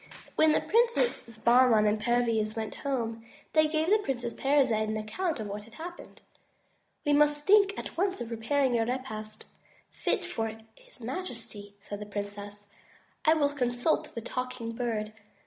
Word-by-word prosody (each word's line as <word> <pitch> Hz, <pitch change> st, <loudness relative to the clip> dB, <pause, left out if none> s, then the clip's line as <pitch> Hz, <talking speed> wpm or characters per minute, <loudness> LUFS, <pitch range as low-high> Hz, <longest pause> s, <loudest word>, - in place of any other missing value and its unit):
When 315 Hz, 0 st, +5 dB
the -, -, +3 dB
Princes 470 Hz, -, +1 dB
Bahman 235 Hz, -1 st, +5 dB
and 210 Hz, 0 st, +2 dB
Perviz 230 Hz, -2 st, +1 dB
went 220 Hz, -2 st, -3 dB
home, 230 Hz, -5 st, -3 dB, 0.3 s
they 310 Hz, -1 st, +5 dB
gave 315 Hz, +3 st, 0 dB
the 430 Hz, -, +6 dB
Princess 245 Hz, -, -3 dB
Parizade 260 Hz, -6 st, +2 dB
an 215 Hz, -, -1 dB
account 295 Hz, -, -2 dB
of 215 Hz, -, -3 dB
what 205 Hz, +1 st, -5 dB
had 225 Hz, -, -17 dB
passed. 345 Hz, +4 st, -9 dB, 0.8 s
"We 290 Hz, -, +3 dB
must 295 Hz, 0 st, +3 dB
think 400 Hz, 0 st, +5 dB
at -, -, -6 dB
once 375 Hz, +2 st, 0 dB
of 235 Hz, -1 st, -5 dB
preparing 240 Hz, +2 st, +1 dB
a 225 Hz, -, +2 dB
repast 220 Hz, -4 st, -5 dB, 0.5 s
fit -, -, -1 dB
for 225 Hz, -1 st, -3 dB, 0.2 s
his 250 Hz, -, -17 dB
majesty," 225 Hz, -, -6 dB
said 205 Hz, 0 st, -7 dB
the 210 Hz, -, -7 dB
princess. 205 Hz, 0 st, -6 dB, 0.6 s
"I 315 Hz, +1 st, +6 dB
will 290 Hz, -2 st, +2 dB
consult 245 Hz, +2 st, 0 dB
the 230 Hz, -, -3 dB
Talking 250 Hz, -1 st, -4 dB
Bird. 225 Hz, -3 st, -2 dB
240 Hz, 160 wpm, -29 LUFS, 215-295 Hz, 0.8 s, the